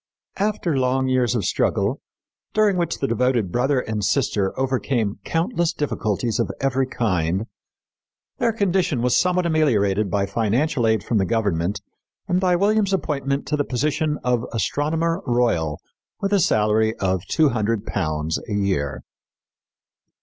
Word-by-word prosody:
After 200 -6 0
long 130 0 +1
years 125 -2 +2
of 105 -6 -1
struggle, - - 0 0.5
during 215 -2 +3
which 175 -1 -1
the 135 - -1
devoted 120 -5 +1
brother 130 +4 +1
and 110 -3 -3
sister 95 0 +1
overcame 130 -5 -1
countless 170 0 0
difficulties 115 -6 -1
of - - 0
every 135 -1 +1
kind, 95 -5 0 0.9
their 230 - +2
condition 185 - 0
was 125 - +2
somewhat 180 0 +2
ameliorated 110 - +2
by 100 0 +1
financial 115 +5 0
aid 110 -3 +2
from 110 0 0
the 95 - +2
government 100 -2 -1 0.4
and 180 - +1
by 180 -1 +2
William's 200 +1 +2
appointment 140 -6 -1
to 150 - -1
the 145 - +1
position 150 +4 -1
of 125 -2 +1
astronomer 160 - 0
royal 115 -11 +1 0.4
with 200 +1 -1
a 200 - +4
salary 110 - +2
of 95 -2 0
£200 105 - 0
a - - -2
year. 95 -9 -1
125 Hz, 135 wpm, -22 LUFS, 105-155 Hz, 0.9 s, a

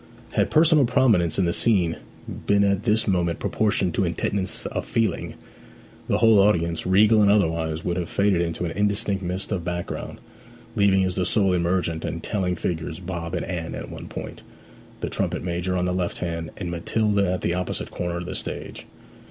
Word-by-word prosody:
Had - - +1
personal 155 -3 +5
prominence 115 - +3
in 95 - +2
the 85 - +1
scene 90 -7 +2 0.5
been 100 0 +4
at 100 +1 +1
this 110 0 +2
moment 85 -4 +1
proportioned 100 -4 0
to - - +1
intentness 95 +3 -2
of - - -4
feeling, 115 -1 -1 0.7
the 105 - +2
whole 110 -2 +5
audience, 85 -5 +2
regal 105 +3 +5
and 100 - +5
otherwise, 80 -5 +1
would 85 0 -1
have 85 -2 -3
faded 100 -3 +2
into 85 0 -2
an 85 - -3
indistinct 100 0 0
mist 90 +2 -4
of 95 -4 -1
background, 90 0 -4 0.6
leaving 95 -2 +4
as 90 -1 0
the 90 - 0
sole 95 +1 +2
emergent 85 -2 0
and 85 -1 -4
telling 90 -4 -1
figures 80 -1 -3
Bob 85 -2 -5
and - - -2
Anne 85 -2 -4
at - - -7
one - - -8
point, - - -7 0.6
the - - -1
trumpet - - -2
major 90 +1 -1
on 90 - 0
the 90 - 0
left 90 -1 -2
hand, 85 -2 -4
and 90 -4 -4
Matilda 100 +2 +1
at 90 - -3
the 85 - 0
opposite 90 0 -3
corner 85 0 -3
of 90 - -5
the - - -5
stage. - - -5
90 Hz, 185 wpm, -24 LUFS, 85-100 Hz, 0.7 s, personal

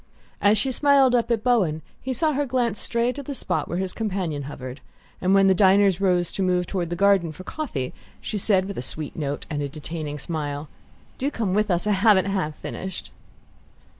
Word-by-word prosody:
As 205 +2 +5
she 260 +6 0
smiled 275 -1 +4
up 240 -1 +2
at 225 -2 +1
Bowen 185 - +2 0.2
he 260 - -3
saw 305 +5 +2
her 285 +1 0
glance 240 -4 0
stray 235 +1 0
to 285 - -6
the 280 0 -6
spot - - -1
where 175 - -3
his 185 0 -2
companion 185 -9 -2
hovered; 130 -1 -8 0.4
and 185 +1 +3
when 195 0 +6
the 190 - +6
diners 195 -1 +4
rose 180 -3 +2
to - - -4
move 180 -1 +2
toward 175 -2 -2
the 175 - -2
garden 195 -3 +3
for 170 +4 -10
coffee 185 - -4 0.3
she 210 - -4
said, 190 -2 +2
with 200 0 -5
a - - -2
sweet 150 +3 -5
note 145 -2 -3
and 145 -1 -3
a 140 - -2
detaining 155 0 -6
smile: 145 -1 -4 0.5
"Do 275 - 0
come 220 -9 -2
with 210 +1 +1
us 175 0 +1
I 210 - +2
haven't 200 -1 +4
half 190 -6 -1
finished." 190 - -6
190 Hz, 205 wpm, -24 LUFS, 160-225 Hz, 0.5 s, when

